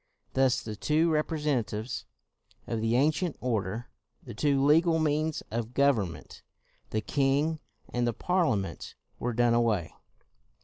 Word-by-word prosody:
Thus 130 -1 +3
the 110 -1 -5
two 155 +9 +2
representatives 145 -8 -1 0.6
of 115 -2 -2
the 115 +1 +1
ancient 155 +5 +1
order, 110 -2 -2 0.3
the - - -8
two 140 +4 +2
legal 165 +3 +4
means 155 0 0
of 115 +1 -3
government, 110 - 0 0.5
the 110 - -1
king 145 +5 +1 0.3
and 120 0 -1
the 120 - 0
Parliament 110 - -1 0.2
were 120 0 -1
done 120 0 +3
away. 110 -8 +1
130 Hz, 125 wpm, -29 LUFS, 115-150 Hz, 0.6 s, legal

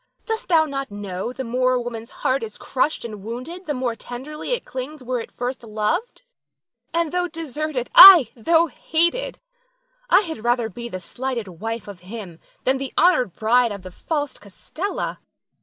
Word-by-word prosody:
Dost 450 +2 -3
thou 325 -3 +4
not 275 -3 -4
know 205 +1 -5
the 265 +1 -5
more 255 +1 +1
a 250 - +1
woman's 235 -1 -6 0.2
heart 265 +1 +2
is 220 -2 -7
crushed 265 0 -1
and 210 -3 -7
wounded 255 - -7
the 295 - 0
more 250 -2 -1
tenderly 275 - -7
it - - -2
clings 260 +3 -6
where 250 -1 -2
first 245 +1 -4
it - - -11
loved; 215 - -2 0.7
and 335 -2 0
though 360 0 0
deserted, 310 -5 -4
ay, 355 - +11
though 325 +8 +3
hated, 340 +8 -1 0.7
I - - +6
had 320 - -6
rather 240 -1 +1
be 235 +4 -7
the 185 - -5
slighted 240 +4 -4
wife 225 0 -4
of 200 -3 -9
him, 185 -2 -9 0.2
than 265 +1 +1
the 270 -1 -4
honored 310 - +3
bride 235 +2 +3
of 200 -2 -7
the 185 - -9
false 290 - -3
Costella. 310 - -5
255 Hz, 175 wpm, -22 LUFS, 225-315 Hz, 0.7 s, ay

